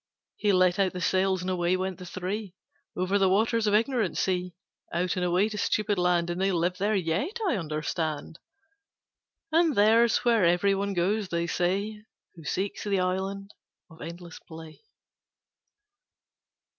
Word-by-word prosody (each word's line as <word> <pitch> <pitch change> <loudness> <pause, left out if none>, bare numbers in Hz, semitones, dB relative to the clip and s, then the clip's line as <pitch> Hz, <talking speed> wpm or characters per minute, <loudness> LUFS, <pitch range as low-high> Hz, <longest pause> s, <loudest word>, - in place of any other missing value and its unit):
He 210 - +2
let 185 0 +3
out 190 -2 +2
the 180 - -5
sails 185 +1 +1
and 185 - -2
away 180 0 +1
went 185 0 -3
the 180 - -9
three 185 +2 -5 0.4
Over 185 +3 +1
the 190 -1 +4
waters 220 +3 +2
of 205 - +3
Ignorant 230 -3 +1
Sea, 180 -1 -1 0.4
Out 175 +2 -1
and 180 - -1
away 180 +3 +2
to 210 -1 -5
Stupid 210 -2 0
Land; 175 -1 +1
And 175 +2 -3
they 195 0 +2
live 180 +1 0
there 210 +2 +1
yet, 195 - -1
I 310 - +2
understand. 155 -2 -3 1.1
And 325 -2 +3
there's 225 +4 +4
where 230 -4 +4
every 180 +3 +3
one 200 0 -2
goes, 195 +4 0
they 170 0 -1
say, 200 +5 -1 0.3
Who 165 - -13
seeks 190 +7 -3
the 200 -2 0
Island 190 +2 -2 0.4
of 160 - -15
Endless 170 +1 -9
Play. 160 -1 -12
185 Hz, 155 wpm, -27 LUFS, 175-205 Hz, 1.1 s, the